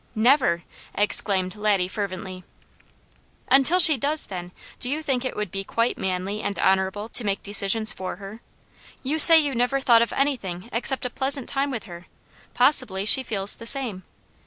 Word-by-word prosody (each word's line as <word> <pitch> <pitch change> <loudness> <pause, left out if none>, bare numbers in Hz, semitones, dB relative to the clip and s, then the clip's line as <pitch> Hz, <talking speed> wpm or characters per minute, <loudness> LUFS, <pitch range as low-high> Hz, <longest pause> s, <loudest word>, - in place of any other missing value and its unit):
"Never!" 225 - +1 0.3
exclaimed 200 -2 +2
Laddie 205 -3 -1
fervently. 185 -1 -8 1.1
"Until 275 +6 +4
she 325 -5 +7
does, 290 +5 +1
then, 180 -2 -9 0.3
do 250 - -2
you 305 +3 -4
think 265 -4 -3
it 255 - -6
would 210 -4 -6
be 195 0 -6
quite 230 +4 -3
manly 190 +3 -5
and 200 - -5
honourable 190 +2 -1
to 240 - 0
make 200 -1 -4
decisions 205 +2 0
for 185 0 -8
her? 200 +4 -12 0.6
You 295 +4 -3
say 330 +2 +11
you 290 -3 -2
never 245 +3 -2
thought 240 -4 +3
of 235 - -2
anything 235 -9 -4
except 255 +3 -1
a 250 - -5
pleasant 270 0 -4
time 280 0 -3
with 240 -6 -6
her; 175 -3 -13 0.5
possibly 250 -7 +2
she 240 +5 +6
feels 205 -5 +1
the 230 - -4
same. 240 -8 -1
220 Hz, 170 wpm, -22 LUFS, 195-265 Hz, 1.1 s, say